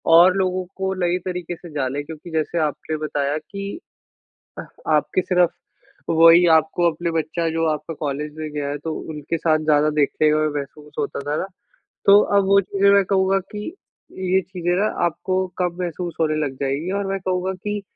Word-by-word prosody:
और 180 +3 +7
लोगों 185 -1 0
को 190 0 -1
नए 175 +1 +1
तरीके 180 -2 -4
से 175 +1 -12
जानें। 140 0 -1
क्योंकि 160 +2 -10
जैसे 160 +1 -1
आपने 155 +2 -5
बताया 145 0 -1
कि 200 - -7 0.8
अह - - -6 0.3
आपके 150 +5 +1
सिर्फ़ 180 -2 +2 0.6
वही 165 +2 +7
आपको 160 +2 +2
अपने 170 +2 -3
बच्चा 165 +1 -1
जो 165 0 0
आपका 155 +1 -3
कॉलेज 150 +1 -3
में 155 -1 -5
गया 145 -1 -3
है 145 - -3
तो 160 -1 -2 0.2
उनके 150 +2 -3
साथ 155 -1 +2
ज़्यादा 150 0 +4
देखने 150 +1 +3
में 155 0 +2
महसूस 150 +2 -10
होता 145 - -2
था 145 +1 -2
ना - - -2 0.6
तो 200 +1 +8 0.2
अब 200 - +4
वो 200 +1 +5
चीज़ें 200 +1 +2
मैं 200 -1 +5
कहूँगा 190 0 +2
कि 210 - -5 0.7
ये 190 - +5
चीज़ें 175 -1 -3
ना 210 - +2 0.2
आपको 185 +2 -1
कम 180 -1 -1
महसूस 175 0 -4
होने 155 -1 +2
लग 135 -2 -4
जाएँगी 140 +6 -1
और 200 - -2
मैं 195 0 -1
कहूँगा 185 0 -1
कि 205 +2 -4
170 Hz, 185 wpm, -22 LUFS, 155-185 Hz, 0.8 s, तो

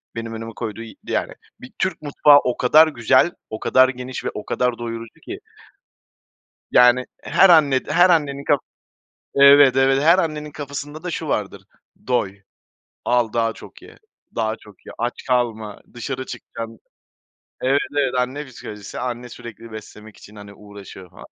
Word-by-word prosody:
benim 115 0 -5
önüme 115 0 -7
koyduğu 115 -1 -5
y 115 - -11
yani, - - -2 0.3
bir 125 - -11
Türk 190 -2 -1
mutfağı 145 0 +5
o 125 - -1
kadar 155 +6 +6
güzel, 130 +3 +2 0.2
o 110 - -6
kadar 130 0 +4
geniş 125 0 -6
ve - - 0
o 105 - -7
kadar 125 -1 -1
doyurucu 115 +4 -7
ki. 375 +2 -7 1.3
Yani, 125 +1 +5 0.2
her 195 - +4
anne 145 -6 +5
her 180 +1 +4
annenin 145 -4 +1
ka 145 - +3 0.8
Evet, 140 -1 +7
evet 135 +1 +3
her 170 +4 +5
annenin 155 -3 -2
kafasında 145 +1 -7
da 180 - -3
şu 160 -1 -5
vardır, 100 -4 -3 0.4
"doy, 100 -6 -1 0.6
al 120 -2 +1
daha 115 -1 0
çok - - -14
ye, - - -15 0.4
daha 110 -1 -1
çok 105 -4 -19
ye, - - -9
aç 120 +1 -2
kalma" 115 -4 -1
dışarı 130 +2 -5
çıkacağım 115 -2 -8 0.8
Evet, 135 +2 +2 0.2
evet, 135 -3 +1
anne 130 +4 -2
psikolojisi 105 -6 -9
anne 125 0 -5
sürekli 115 -1 -11
beslemek 110 0 -11
için, 105 - -15
hani, 100 0 -11
uğraşıyor 100 -3 -13
falan. - - -14
125 Hz, 155 wpm, -21 LUFS, 115-140 Hz, 1.3 s, Evet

